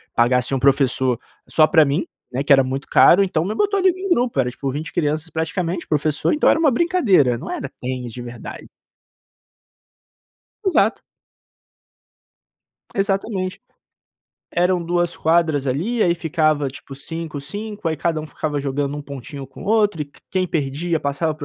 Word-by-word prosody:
pagar 125 +2 +4
assim 125 +2 -3
um - - 0
professor 130 -2 +2 0.3
só 155 - +5
pra 155 -1 +5
mim, 145 +5 0 0.3
né, 130 +3 -2
que 145 - -1
era 135 - +6
muito 135 +2 -4
caro, 195 +3 +6
então 170 -3 0
me 215 - -2
botou 405 -1 +1
ali 375 0 +4
num 375 +1 -5
grupo, 245 - +1
era 125 -1 +2
tipo 135 +2 -4
20 155 +3 -5
crianças 155 0 -1
praticamente, 170 +2 -2
o - - -41
professor, 150 0 +1
então 300 - +3
era - - +3
uma 300 -5 +4
brincadeira, 230 - +3
não - - -8
era 140 - -4
tênis 125 -2 -4
de 120 - -7
verdade. 120 -1 -9 2.0
Exato. 280 - +2 1.9
Exatamente. 195 -1 -1 0.9
Eram 180 0 +1
2 175 0 0
quadras 160 -4 +2
ali, 205 - -1
aí 175 -1 +3
ficava 155 -3 +1
tipo, 135 0 -9
5, 160 +1 -6
5. 205 +5 -5
Aí, 160 - 0
cada 160 +2 -1
um, 155 - -6
ficava 150 -1 -3
jogando 140 +1 -2
um 145 - -5
pontinho 140 0 -8
com 130 - -14
o - - -9
outro 210 -6 +2
e 145 -1 -7 0.2
quem 185 -1 0
perdia 155 +2 -1
passava 145 +3 -1
para 150 - -9
155 Hz, 170 wpm, -21 LUFS, 140-185 Hz, 2.0 s, era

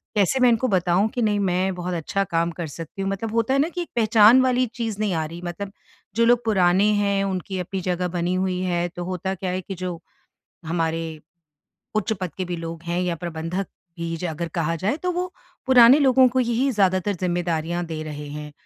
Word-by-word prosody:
कैसे 210 +6 +2
मैं 250 -1 +6
इनको 235 +2 +2
बताऊँ 180 +3 +2
कि 245 - 0
नहीं 210 -2 +2
मैं 185 +1 0
बहुत 180 0 -4
अच्छा 175 +4 -1
काम 170 +1 +2
कर 165 - -2
सकती 165 +3 -7
हूँ। 195 - -1
मतलब 215 +3 -4
होता 230 +3 +1
है 275 - +3
न 310 - +2
कि 355 - -1
एक 345 - -6
पहचान 225 +2 +6
वाली 255 0 +2
चीज़ 220 -3 -2
नहीं 210 -4 0
आ 160 -1 -1
रही 170 +3 -8
मतलब 195 +3 -5 0.4
जो 230 +1 +4
लोग 240 0 +4
पुराने 190 -2 +3 0.2
हैं, 200 -1 +1
उनकी 190 0 -3
अपनी 185 +1 -4
जगह 180 0 -1
बनी 175 +1 0
हुई 185 -1 0
है, 175 -1 0
तो 175 0 -7
होता 185 +1 -3
क्या 185 0 -4
है 185 +1 -2
कि 195 +1 -7
जो 180 -2 -5 0.7
हमारे 165 0 -1 0.9
उच्च 215 0 0
पद 180 -3 -4
के 185 - -1
भी 175 -1 -4
लोग 165 0 -7
हैं 170 +1 -2
या 180 -1 0
प्रबंधक 170 +3 -3 0.3
भी 165 0 -3
ज 180 - -6
अगर 170 +1 -4
कहा 165 0 0
जाए 195 - -1
तो 360 - 0
वो 360 +1 -3 0.3
पुराने 255 +1 +8
लोगों 260 -2 +5
को 255 +1 +1
यही 245 +3 +1
ज़्यादातर 195 -1 +2
ज़िम्मेदारियाँ 175 -1 -1
दे 160 -1 -5
रहे 150 -1 -7
हैं। 150 0 -7
185 Hz, 215 wpm, -23 LUFS, 170-220 Hz, 0.9 s, पुराने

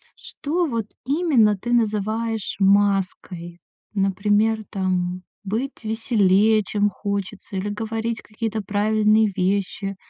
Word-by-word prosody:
что 325 +3 -2
вот 230 -5 -2 0.2
именно 270 - +3
ты 240 +5 -3
называешь 220 -1 0
маской? 195 -3 +1 0.4
Например, 205 +3 +2
там, 185 -2 -1 0.2
быть 230 +6 -3
веселее, 215 -1 +3
чем 205 +1 +1
хочется, 200 0 -5
или 205 +2 -2
говорить 225 +2 -3
какие-то 220 0 -4
правильные 215 +1 +2
вещи, 195 +1 -1
210 Hz, 100 wpm, -23 LUFS, 195-225 Hz, 0.4 s, именно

